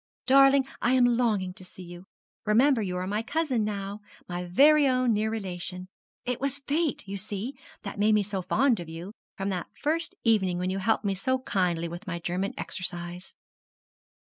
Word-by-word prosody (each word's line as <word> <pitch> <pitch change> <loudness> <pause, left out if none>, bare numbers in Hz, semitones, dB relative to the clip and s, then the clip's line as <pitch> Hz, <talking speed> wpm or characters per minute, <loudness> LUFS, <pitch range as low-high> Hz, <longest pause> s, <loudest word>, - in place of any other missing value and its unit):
Darling, 275 0 +6 0.2
I 245 - +2
am 255 -1 +5
longing 225 -6 +1
to 185 - -12
see 185 0 -12
you. 175 +1 -11 0.4
Remember 240 +3 +4
you 180 -3 -2
are 180 - -2
my 205 +3 -1
cousin 275 -2 0
now 200 -1 -4 0.3
my 175 0 -4
very 285 +11 +5
own 255 -2 +2
near 215 +1 +1
relation. 185 -4 -4 0.4
It 250 0 -2
was 275 0 +1
Fate, 290 -3 -1
you 200 +1 -4
see, 210 +5 -5 0.3
that 200 0 -6
made 215 +1 +4
me 210 - +3
so 195 -1 -3
fond 235 +5 +2
of 170 -2 -7
you, 165 +4 -7 0.3
from 195 +1 -2
that 180 -3 -3
first 320 +2 -1
evening 190 -6 +2
when 180 +1 -1
you 195 - -2
helped 220 +2 +1
me 200 - +1
so 260 +8 0
kindly 180 -9 -1
with 175 +5 -8
my 175 -2 -2
German 180 +3 -2
exercise.' 175 0 -5
205 Hz, 185 wpm, -27 LUFS, 185-250 Hz, 0.4 s, Darling